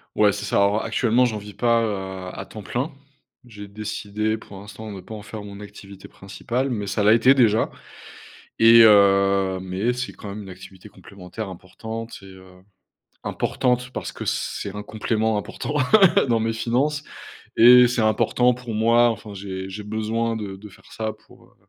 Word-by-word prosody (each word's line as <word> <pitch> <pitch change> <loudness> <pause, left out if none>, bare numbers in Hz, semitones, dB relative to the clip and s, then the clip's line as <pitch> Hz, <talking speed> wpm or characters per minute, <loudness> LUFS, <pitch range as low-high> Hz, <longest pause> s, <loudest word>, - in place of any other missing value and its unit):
Ouais, 105 -1 +4
c'est 105 - -5
ça, 100 - 0
alors 100 +2 +2
actuellement, 120 +2 +2
j'en 110 -3 -2
vis 105 -1 -12
pas 115 +2 +2
à, - - +1 0.5
heu, - - -8
à - - -6
temps 110 - -10
plein. 125 - -3 0.5
J'ai 105 -4 -11
décidé, 105 +1 -3
pour 100 -2 -13
l'instant, 105 +2 -9
de 95 - -8
pas 110 +4 -10
en 105 - -9
faire 105 0 -8
mon 100 -1 -10
activité 100 -1 -12
principale 120 +7 -4
mais 105 -5 -3
ça 100 +2 -1
l'a 105 +1 +6
été 115 +4 +5
déjà 115 -5 +3 0.9
et 115 +1 +8
heu, 100 -2 +4
mais 95 +6 -2
c'est 125 +1 -4
quand - - -11
même 105 +1 -7
une 95 - -11
activité 95 +2 -13
complémentaire 100 +2 -9
importante 110 +5 -8
et - - -14
heu, 95 -1 -15 0.6
importante 125 0 -1
parce - - -5
que - - -8
c'est 100 -1 -3
un 105 - -5
complément 110 0 -1
important 125 +7 -5 0.5
dans 115 -2 +2
mes 115 0 0
finances 125 +6 -1 0.5
et 125 +1 +8
c'est 120 -1 -1
important 115 +3 +2
pour 125 -2 -7
moi, 115 +2 +4
enfin, 110 -2 -9
j'ai 95 -1 -6
j'ai 105 +2 -7
besoin 110 +2 -2
de 105 -3 -6
de 105 +2 -12
faire 100 - -19
ça 110 -1 -4
pour, - - -19
heu, - - -31
110 Hz, 185 wpm, -22 LUFS, 100-115 Hz, 0.9 s, et